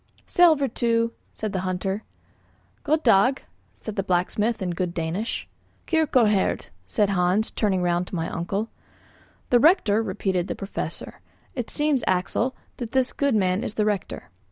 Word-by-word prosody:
"Sællvertu," 245 Hz, -9 st, +3 dB, 0.2 s
said 215 Hz, -1 st, -4 dB
the 190 Hz, -, 0 dB
hunter. 190 Hz, +2 st, -2 dB, 0.8 s
"God 310 Hz, +1 st, +1 dB
dag," 245 Hz, +4 st, +4 dB, 0.3 s
said 215 Hz, -2 st, -8 dB
the -, -, +2 dB
blacksmith 200 Hz, +4 st, 0 dB
in 185 Hz, -2 st, -2 dB
good 175 Hz, 0 st, -3 dB
Danish. 170 Hz, +7 st, -3 dB, 0.4 s
"Kyrkoherde," 250 Hz, -, +2 dB, 0.2 s
said 200 Hz, -, +1 dB
Hans, 185 Hz, +3 st, +1 dB
turning 190 Hz, -4 st, 0 dB
round 175 Hz, 0 st, +1 dB
to -, -, -6 dB
my 165 Hz, -1 st, -1 dB
uncle. 195 Hz, +6 st, -3 dB, 0.8 s
"The 245 Hz, -, +6 dB
rector," 230 Hz, -, +4 dB
repeated 190 Hz, -3 st, -1 dB
the -, -, -3 dB
Professor. 195 Hz, 0 st, -6 dB, 0.3 s
"It 245 Hz, -4 st, -4 dB
seems, 295 Hz, -4 st, +1 dB
Axel, 190 Hz, +7 st, 0 dB, 0.2 s
that 235 Hz, -3 st, -6 dB
this 260 Hz, -1 st, +2 dB
good 280 Hz, -4 st, +1 dB
man 190 Hz, +1 st, +1 dB
is 210 Hz, -, -4 dB
the 210 Hz, -, +1 dB
rector." 205 Hz, -, -3 dB
210 Hz, 145 wpm, -24 LUFS, 185-240 Hz, 0.8 s, The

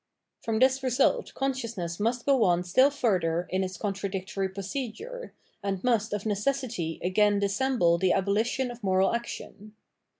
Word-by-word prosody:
From 225 Hz, -1 st, -1 dB
this 260 Hz, +2 st, +3 dB
result 255 Hz, 0 st, +1 dB
consciousness 230 Hz, -11 st, -3 dB
must 230 Hz, +3 st, 0 dB
go 270 Hz, -4 st, +4 dB
on 175 Hz, -2 st, +3 dB
still 255 Hz, +11 st, +4 dB
fur 240 Hz, -9 st, +1 dB
ther 165 Hz, +1 st, -1 dB
in 190 Hz, +1 st, +1 dB
its 185 Hz, -1 st, -5 dB
contradictory 195 Hz, -1 st, -3 dB
procedure, 260 Hz, -, -6 dB, 0.3 s
and 195 Hz, -2 st, -3 dB
must 230 Hz, -4 st, +1 dB
of 205 Hz, -1 st, -2 dB
neces 220 Hz, +7 st, 0 dB
sity 170 Hz, -9 st, -4 dB
again 205 Hz, +2 st, +3 dB
dissemble 200 Hz, -3 st, +2 dB
the 185 Hz, 0 st, +3 dB
abolition 220 Hz, +6 st, 0 dB
of 240 Hz, 0 st, -11 dB
moral 190 Hz, 0 st, +2 dB
action. 215 Hz, -2 st, -6 dB
210 Hz, 155 wpm, -28 LUFS, 190-250 Hz, 0.3 s, go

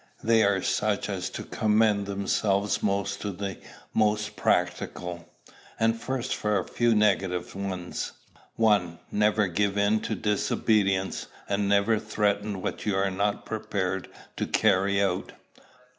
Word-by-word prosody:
They 115 Hz, 0 st, +4 dB
are 100 Hz, -2 st, +2 dB
such 105 Hz, -1 st, 0 dB
as 95 Hz, -3 st, -2 dB
to -, -, -6 dB
commend 105 Hz, -2 st, +2 dB
themselves 100 Hz, 0 st, 0 dB
most 100 Hz, -1 st, -1 dB
to 100 Hz, -, -2 dB
the 95 Hz, 0 st, -5 dB, 0.3 s
most 105 Hz, -1 st, +1 dB
practical. 90 Hz, -1 st, -1 dB, 0.5 s
And 115 Hz, 0 st, +2 dB
first 130 Hz, -1 st, -2 dB
for 105 Hz, -1 st, 0 dB
a 95 Hz, -, -2 dB
few 120 Hz, -1 st, +2 dB
negative 95 Hz, -4 st, +1 dB
ones. 95 Hz, -2 st, -4 dB, 0.4 s
1. 100 Hz, -7 st, +2 dB
Never 105 Hz, 0 st, +3 dB
give 100 Hz, +2 st, 0 dB
in 100 Hz, +2 st, +3 dB
to -, -, -3 dB
disobedience; 100 Hz, -2 st, +1 dB, 0.2 s
and 100 Hz, 0 st, 0 dB
never 100 Hz, +2 st, +3 dB
threaten 105 Hz, -2 st, -1 dB
what -, -, -3 dB
you 105 Hz, -2 st, 0 dB
are 95 Hz, 0 st, +1 dB
not 100 Hz, +2 st, -1 dB
prepared 95 Hz, -4 st, -2 dB, 0.3 s
to -, -, -1 dB
carry 100 Hz, +1 st, +3 dB
out. 100 Hz, -, -1 dB
100 Hz, 135 wpm, -27 LUFS, 95-105 Hz, 0.5 s, They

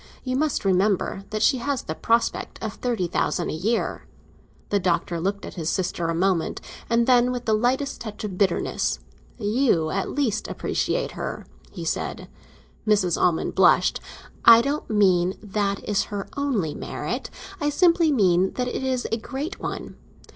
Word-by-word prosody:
You 255 Hz, -1 st, -2 dB
must 290 Hz, -5 st, 0 dB
remember 195 Hz, 0 st, +1 dB
that 215 Hz, 0 st, -1 dB
she 260 Hz, +1 st, +4 dB
has 275 Hz, +1 st, -2 dB
the 155 Hz, -, -4 dB
prospect 230 Hz, +7 st, 0 dB
of 215 Hz, -2 st, -3 dB
thirty 235 Hz, -7 st, -1 dB
thousand 175 Hz, 0 st, -1 dB
a -, -, -4 dB
year." 215 Hz, +9 st, -1 dB, 0.6 s
The 205 Hz, -, +2 dB
Doctor 175 Hz, -1 st, 0 dB
looked 200 Hz, +4 st, -2 dB
at -, -, -8 dB
his 165 Hz, -3 st, -3 dB
sister 175 Hz, -2 st, -1 dB
a 165 Hz, -, -1 dB
moment, 180 Hz, -1 st, +1 dB, 0.3 s
and 235 Hz, 0 st, +3 dB
then, 250 Hz, 0 st, +4 dB
with 245 Hz, -1 st, -4 dB
the 220 Hz, -, +1 dB
slightest 255 Hz, +5 st, 0 dB
touch 215 Hz, -2 st, -7 dB
of 200 Hz, -3 st, -4 dB
bitterness: 185 Hz, -2 st, 0 dB, 0.4 s
"You 210 Hz, -, +1 dB
at 195 Hz, -, -1 dB
least 235 Hz, -7 st, -1 dB
appreciate -, -, -1 dB
her," -, -, -5 dB, 0.2 s
he -, -, -7 dB
said. -, -, -3 dB, 0.6 s
Mrs. 195 Hz, -6 st, +3 dB
Almond 170 Hz, -3 st, +1 dB
blushed. -, -, +4 dB, 0.4 s
"I 230 Hz, 0 st, +9 dB
don't 285 Hz, +3 st, -2 dB
mean 185 Hz, -4 st, +3 dB
that 200 Hz, -1 st, -2 dB
is 205 Hz, -1 st, +1 dB
her 205 Hz, -2 st, -5 dB
only 245 Hz, -, 0 dB
merit; -, -, -4 dB, 0.3 s
I 295 Hz, -, +1 dB
simply 335 Hz, +1 st, +4 dB
mean 190 Hz, -7 st, +3 dB
that 250 Hz, -1 st, -2 dB
it 250 Hz, -, -3 dB
is 260 Hz, -1 st, -1 dB
a 225 Hz, -, +1 dB
great 280 Hz, -, -5 dB
one. -, -, -5 dB
215 Hz, 165 wpm, -24 LUFS, 185-250 Hz, 0.6 s, I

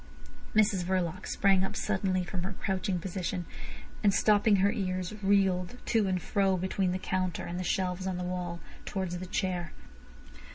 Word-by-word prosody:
Mrs 205 Hz, -4 st, +4 dB
Verloc 180 Hz, -2 st, -1 dB
sprang 195 Hz, -1 st, +3 dB
up 195 Hz, -, -3 dB
suddenly 190 Hz, -2 st, 0 dB
from 180 Hz, 0 st, -4 dB
her 190 Hz, +3 st, -3 dB
crouching 190 Hz, 0 st, -1 dB
position, 180 Hz, 0 st, -3 dB, 0.6 s
and 205 Hz, -, +6 dB
stopping 210 Hz, +1 st, +4 dB
her 200 Hz, +1 st, +4 dB
ears, 185 Hz, -2 st, -2 dB
reeled 195 Hz, 0 st, +2 dB
to 220 Hz, -3 st, +2 dB
and 185 Hz, -1 st, +1 dB
fro 195 Hz, +1 st, +1 dB
between 185 Hz, 0 st, 0 dB
the 185 Hz, -, 0 dB
counter 185 Hz, -2 st, -1 dB
and 175 Hz, +1 st, -4 dB
the -, -, -2 dB
shelves 185 Hz, 0 st, -1 dB
on 185 Hz, -2 st, -1 dB
the 180 Hz, -, -3 dB
wall 180 Hz, -1 st, -3 dB, 0.2 s
towards 185 Hz, -3 st, -3 dB
the 185 Hz, -, -6 dB
chair. 180 Hz, -3 st, -2 dB
185 Hz, 165 wpm, -30 LUFS, 180-195 Hz, 0.6 s, and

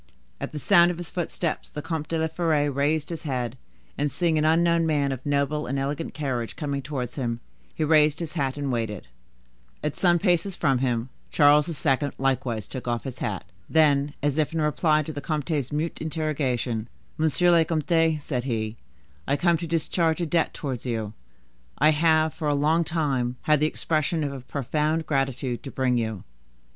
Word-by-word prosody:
At -, -, -4 dB
the 155 Hz, -, -6 dB
sound 175 Hz, +2 st, +5 dB
of 175 Hz, -, -3 dB
his 175 Hz, -1 st, -7 dB
footsteps, 175 Hz, -2 st, -3 dB
the 150 Hz, -, -6 dB
Comte 160 Hz, -2 st, -3 dB
de 165 Hz, -, -1 dB
la 160 Hz, -, +1 dB
Fere 160 Hz, -3 st, +1 dB
raised 145 Hz, +3 st, 0 dB
his 165 Hz, -2 st, -5 dB
head, 125 Hz, -5 st, -2 dB, 0.4 s
and 145 Hz, 0 st, +1 dB
seeing 165 Hz, 0 st, +1 dB
an 155 Hz, -, +1 dB
unknown 165 Hz, +1 st, +3 dB
man 145 Hz, -3 st, +1 dB
of 130 Hz, -1 st, -5 dB
noble 145 Hz, +1 st, 0 dB
and 135 Hz, +3 st, -2 dB
elegant 140 Hz, +4 st, -3 dB
carriage 130 Hz, -6 st, -2 dB
coming 140 Hz, -2 st, -3 dB
towards 130 Hz, -3 st, -5 dB
him, 120 Hz, -3 st, -2 dB, 0.4 s
he 155 Hz, -, -1 dB
raised 150 Hz, -1 st, +4 dB
his 165 Hz, -3 st, -4 dB
hat 140 Hz, -4 st, -1 dB
and 140 Hz, -2 st, -2 dB
waited. 110 Hz, -, -3 dB, 0.7 s
At 150 Hz, -1 st, -1 dB
some 175 Hz, -2 st, +4 dB
paces 180 Hz, +1 st, +1 dB
from 135 Hz, -3 st, +2 dB
him, 125 Hz, -1 st, 0 dB, 0.2 s
Charles 150 Hz, +1 st, +5 dB
II. 140 Hz, -4 st, +1 dB, 0.2 s
likewise 130 Hz, -5 st, -1 dB
took 130 Hz, -2 st, -7 dB
off 120 Hz, -1 st, -1 dB
his 130 Hz, -2 st, -6 dB
hat. 100 Hz, -3 st, -3 dB, 0.3 s
Then, 145 Hz, -2 st, +3 dB
as 145 Hz, +1 st, +1 dB
if 155 Hz, +1 st, +1 dB
in 165 Hz, -, 0 dB
reply 155 Hz, 0 st, +2 dB
to 155 Hz, -, -6 dB
the 145 Hz, -, -5 dB
comte's 150 Hz, -3 st, -2 dB
mute 155 Hz, +3 st, -2 dB
interrogation,— 135 Hz, -8 st, -1 dB, 0.3 s
"Monsieur 160 Hz, +3 st, +3 dB
le 170 Hz, -1 st, +6 dB
Comte," 160 Hz, 0 st, +2 dB
said 130 Hz, -4 st, -3 dB
he, 110 Hz, -3 st, -2 dB, 0.5 s
"I 140 Hz, -, +2 dB
come 170 Hz, 0 st, +3 dB
to 170 Hz, +1 st, -5 dB
discharge 165 Hz, 0 st, +1 dB
a 175 Hz, -, 0 dB
debt 165 Hz, +1 st, +1 dB
towards 130 Hz, -5 st, -5 dB
you. 110 Hz, -4 st, -3 dB, 0.6 s
I 155 Hz, +3 st, +5 dB
have, 155 Hz, 0 st, +3 dB
for 155 Hz, -, -4 dB
a 145 Hz, -, +2 dB
long 155 Hz, +4 st, +3 dB
time, 135 Hz, -7 st, -1 dB
had 150 Hz, -1 st, +4 dB
the 155 Hz, -, +3 dB
expression 155 Hz, 0 st, -1 dB
of 140 Hz, -1 st, -2 dB
a 135 Hz, -, -6 dB
profound 150 Hz, +5 st, -1 dB
gratitude 135 Hz, -3 st, -1 dB
to 135 Hz, -, -7 dB
bring 130 Hz, -2 st, +1 dB
you. 110 Hz, -4 st, -3 dB
150 Hz, 190 wpm, -25 LUFS, 135-160 Hz, 0.7 s, le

